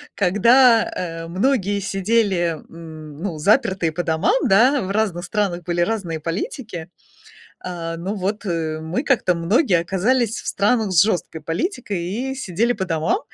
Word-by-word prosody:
когда, 225 +5 +5
э, 165 -2 -5
многие 200 +2 0
сидели, 195 -4 0
м, 160 -3 -10
ну, 170 0 -4
запертые 180 0 +2
по 175 +3 -3
домам, 160 - +1
да, 245 +7 +4
в 185 - -4
разных 195 -5 -1
странах 185 -3 -1
были 175 0 -1
разные 175 -5 -1
политики. 170 - -5 0.7
А, 165 -2 -5
ну 190 +5 -4
вот, 205 +2 -3
э, 160 -4 -2
мы 170 - -2
как-то 235 -11 +2
многие 180 - +2
оказались 220 +7 0
в - - -10
странах 210 0 +1
с 170 -3 +6
жёсткой 175 -6 -2
политикой 195 - -3
и 245 +10 -3
сидели 230 0 0
по 190 -5 -3
домам. 165 - 0
185 Hz, 150 wpm, -21 LUFS, 165-220 Hz, 0.7 s, с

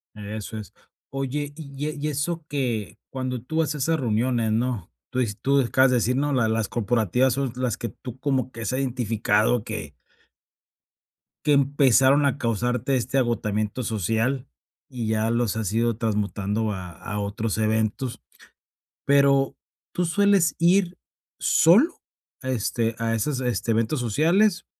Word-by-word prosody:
Eso 105 +1 -6
es. 105 - -9 0.4
Oye, 140 +2 -3
y 145 -2 -6
e 155 - -4
y 150 +1 -2
eso 155 +3 -2
que, 125 -7 -2
cuando 130 -2 -3
tú 160 +6 -5
vas 155 -1 +1
a - - -4
esas 160 +3 +1
reuniones, 115 -1 +1
¿no?, 115 -4 -1 0.2
tú 130 - -2
dis 110 -4 -1
tú 140 +1 +3
acabas 130 +1 +3
de - - +3
decir, 125 +2 +1
¿no? 145 +2 0
la 125 -4 +2
las 110 -1 0
corporativas 120 +2 +1
son 135 -2 -1
las 125 -4 0
que 120 - -4
tú 125 -1 -10
como 130 -2 0
que 115 - -9
has 115 - -2
identificado 115 -3 +1
que 75 -3 -5 1.5
que 150 - +4
empezaron 140 0 +4
a 140 - 0
causarte 125 +3 0
este 130 +2 -1
agotamiento 110 -2 0
social 115 +5 -1 0.4
y 120 -4 -4
ya 110 +1 +1
los 115 -2 0
has 105 -3 -2
ido 115 -1 +1
transmutando 105 -1 -1
a 90 -3 -6
a 105 +4 -6
otros 105 +2 -2
eventos. 110 +3 -1 0.8
Pero, 140 -1 +3 0.4
¿tú 180 - 0
sueles 195 -3 +3
ir 175 +1 +3 0.4
solo, 225 - +4 0.4
este, 115 -2 -1
a 115 0 0
esos, 130 +4 -1
este, 120 -2 -1
eventos 115 +5 +1
sociales, 170 - +2
125 Hz, 150 wpm, -24 LUFS, 110-140 Hz, 1.5 s, que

